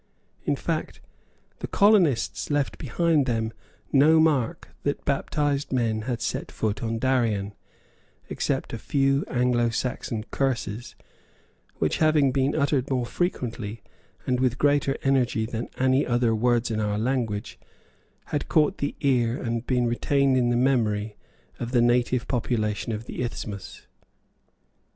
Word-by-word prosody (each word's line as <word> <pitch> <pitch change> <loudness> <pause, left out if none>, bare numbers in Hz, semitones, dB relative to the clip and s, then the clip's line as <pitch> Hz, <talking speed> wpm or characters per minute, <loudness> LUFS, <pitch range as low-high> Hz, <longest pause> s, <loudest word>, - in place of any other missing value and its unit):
In - - +1
fact, - - -3 0.6
the - - -4
colonists 195 - +3
left 145 -2 -1
behind 150 +1 +1
them 115 -2 -1 0.4
no 155 +3 +6
mark 145 -7 +1
that 145 - -2
baptized 145 0 0
men 115 -4 0
had 120 -1 -2
set - - -3
foot 105 -2 -2
on 115 0 -2
Darien, 115 -5 0 0.7
except - - -2
a - - -4
few 135 0 +1
Anglo 120 -1 +1
Saxon 115 -2 -3
curses, 120 -4 -2 0.8
which, - - 0
having 155 -4 +3
been 135 +2 +1
uttered 140 -3 +1
more 130 -3 0
frequently 115 - -3 0.4
and 125 -1 0
with 130 -1 +1
greater 145 -1 +2
energy 125 -5 +2
than 115 +1 -4
any 130 +1 +3
other 120 -2 +1
words 120 +1 +1
in 110 - -1
our 105 -1 0
language, 115 -3 -2 0.7
had 145 - -1
caught 150 -2 +2
the 145 - -2
ear 125 -3 +2
and 115 -1 -3
been 125 -2 +2
retained 135 +3 +2
in 125 -2 +2
the 120 - +2
memory 110 -5 +1 0.4
of 120 +1 -4
the 120 - +4
native 120 0 +2
population 115 -3 -1
of 110 +1 -4
the - - -6
isthmus. 105 -5 -6
125 Hz, 135 wpm, -25 LUFS, 115-140 Hz, 0.8 s, no